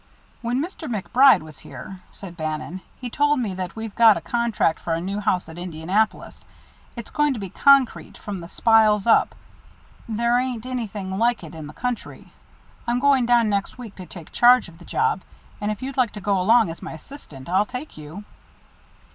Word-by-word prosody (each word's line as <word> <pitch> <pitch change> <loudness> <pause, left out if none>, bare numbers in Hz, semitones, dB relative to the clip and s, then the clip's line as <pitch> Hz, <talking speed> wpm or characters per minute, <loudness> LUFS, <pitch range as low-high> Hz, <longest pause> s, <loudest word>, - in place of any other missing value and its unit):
"When 240 +2 -1
Mr. 335 -3 -7
MacBride 240 - +4
was 155 -3 -13
here," 180 +7 -10
said 185 -3 -10
Bannon, 155 +2 -4 0.2
"he 250 - -5
told 290 +3 +1
me 215 -6 -2
that 185 -1 -5
we've 220 -2 -6
got 225 -3 +6
a - - -5
contract 230 -2 0
for 165 - -2
a - - -2
new 195 +4 -3
house 195 -5 0
at 165 +1 -10
Indianapolis. 180 +5 -2 0.5
It's 235 -2 -8
going 295 -2 +1
to - - -5
be 195 -3 -6
concrete, 275 -3 +3
from 205 -3 -6
the 170 - -9
spiles 215 0 +3
up 230 - +4 0.7
there 235 +2 +2
ain't 250 -3 -3
anything 210 -6 -4
like 235 -3 +1
it 160 - -10
in 160 -2 -8
the 150 - -11
country. 250 -1 -5 0.5
I'm 240 +1 +1
going 270 -2 +3
down 240 -2 +4
next 200 +2 -2
week 235 -5 -9
to 185 -2 -9
take 165 -1 -11
charge 245 -2 +5
of 165 -1 -15
the 175 - -14
job, 445 -1 0 0.4
and 205 - -1
if 215 +3 -4
you'd 270 0 -5
like 250 -4 +2
to 210 - -7
go 195 -1 0
along 225 -1 +4
as 165 - -10
my - - -7
assistant, 155 - -12
I'll 190 +4 +2
take 255 +4 -7
you." 155 +7 -9
215 Hz, 195 wpm, -23 LUFS, 180-245 Hz, 0.7 s, got